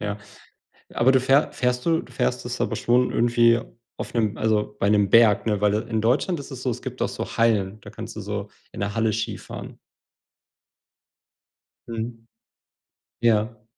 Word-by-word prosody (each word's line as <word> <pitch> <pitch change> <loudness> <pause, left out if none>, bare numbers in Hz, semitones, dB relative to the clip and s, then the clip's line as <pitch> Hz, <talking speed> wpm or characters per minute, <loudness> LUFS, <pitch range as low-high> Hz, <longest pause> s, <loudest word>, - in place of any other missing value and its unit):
Ja, 105 0 -3 0.8
aber 125 +3 +4
du 130 - +4
fähr 135 +4 +3
fährst 125 0 -1
du 165 -1 +3
du - - -15
fährst 65 - -1
es - - -5
aber - - 0
schon 125 +1 +2
irgendwie 115 0 +4 0.4
auf - - -7
'nem 110 -2 0
also, 105 -1 0
bei 100 - +2
'nem 105 -2 +3
Berg, 110 -3 +5
ne, 105 -2 +1
weil, 105 0 +3
äh, 110 - -2
in 110 -1 0
Deutschland 140 - +1
ist 140 - -10
es 130 -2 -8
so, 130 - 0
es 120 +1 -5
gibt 130 -1 -7
doch 120 - +1
so - - -6
Hallen, 110 -3 +1
da - - -10
kannst - - -8
du - - -4
so - - -4 0.2
in - - -8
'ner 100 +1 -2
Halle 110 -1 +1
Skifahren. 110 +1 -5 2.1
Mhm. 115 0 -6 0.9
Ja. 110 -1 +1
115 Hz, 180 wpm, -24 LUFS, 105-125 Hz, 2.1 s, Berg